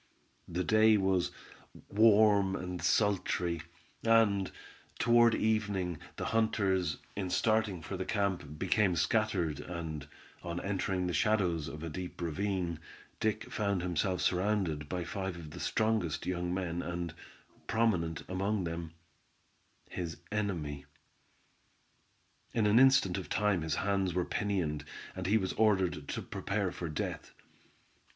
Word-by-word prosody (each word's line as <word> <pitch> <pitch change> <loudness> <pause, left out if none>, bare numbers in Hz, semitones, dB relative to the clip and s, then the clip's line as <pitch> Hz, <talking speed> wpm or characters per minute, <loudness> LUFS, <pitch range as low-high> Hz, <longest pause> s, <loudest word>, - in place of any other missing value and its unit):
The 90 +2 -2
day 110 +3 +5
was 95 -2 +2 0.6
warm 105 -2 +5
and 90 -1 -4
sultry, 90 -5 +1 0.4
and, 110 -4 +4 0.5
toward 120 -1 +5
evening, 100 -6 0 0.2
the - - -4
hunters, 100 -5 +1 0.2
in 95 -2 -2
starting 110 -4 +1
for - - -5
the - - -2
camp, 90 -7 -1
became 95 +1 +2
scattered, 90 -7 +1
and, 80 -2 -5 0.3
on 85 0 -4
entering 95 -2 -1
the 90 - -1
shadows 90 -5 +1
of 75 +3 -7
a 85 - -3
deep 90 +3 -6
ravine, 90 0 -2 0.4
Dick 110 +3 -1
found 100 -5 0
himself 90 +1 0
surrounded 90 -6 0
by 90 -1 -2
five 95 +1 -4
of 80 -3 -9
the - - -8
strongest 110 -8 0
young 90 -1 -1
men, 90 -2 -2
and, 85 -1 -4 0.5
prominent 95 -9 +1
among 95 +2 -1
them, 85 -1 -4 0.9
his 85 -3 -5
enemy. 85 -10 -2 1.7
In 115 -3 +3
an 105 +3 +5
instant 130 -9 +5
of 95 - -8
time 105 -4 +2
his 80 -2 -1
hands 95 -2 0
were 90 -1 +1
pinioned, 90 -8 -1 0.3
and 95 -1 -3
he 105 +3 +4
was 95 -3 -1
ordered 95 -8 +2
to - - -3
prepare 100 -2 -2
for 85 -2 -5
death. 75 - -4
95 Hz, 130 wpm, -32 LUFS, 85-105 Hz, 1.7 s, day